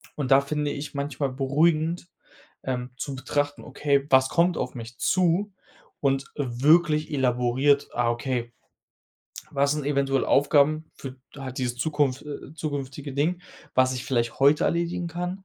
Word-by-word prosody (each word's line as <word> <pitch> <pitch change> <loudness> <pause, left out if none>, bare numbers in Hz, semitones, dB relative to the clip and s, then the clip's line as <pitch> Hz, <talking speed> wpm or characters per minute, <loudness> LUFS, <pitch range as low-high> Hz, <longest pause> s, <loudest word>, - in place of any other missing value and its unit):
Und 135 -3 -3
da 135 +1 +7
finde 150 +1 -2
ich 150 +1 -6
manchmal 140 -1 -2
beruhigend, 155 +5 +1 0.6
ähm, 125 -1 -3
zu 135 -1 -5
betrachten: 145 +2 -2
„Okay, 140 0 0
was 130 0 +5
kommt 175 +1 +2
auf - - -3
mich 115 0 -8
zu“ 185 +3 +1 0.5
und 135 -1 +1
wirklich 150 +4 +2
elaboriert, 130 +2 +2
ah, 120 -1 +1
okay, 120 0 -2 1.0
was 140 +1 +2
sind 150 -2 -3
eventuell 140 -2 +1
Aufgaben 150 +2 +3
für 135 -1 -8 0.2
halt 135 -1 -6
dieses 125 -1 -2
zukunft 145 -1 0
äh, 150 +1 -8
zukünftige 145 -2 -5
Ding, 170 +6 0 0.3
was 130 0 +4
ich 125 0 -5
vielleicht 120 -4 -1
heute 145 +2 +5
erledigen 170 +1 -1
kann, 180 +3 -5
140 Hz, 145 wpm, -25 LUFS, 130-155 Hz, 1.0 s, da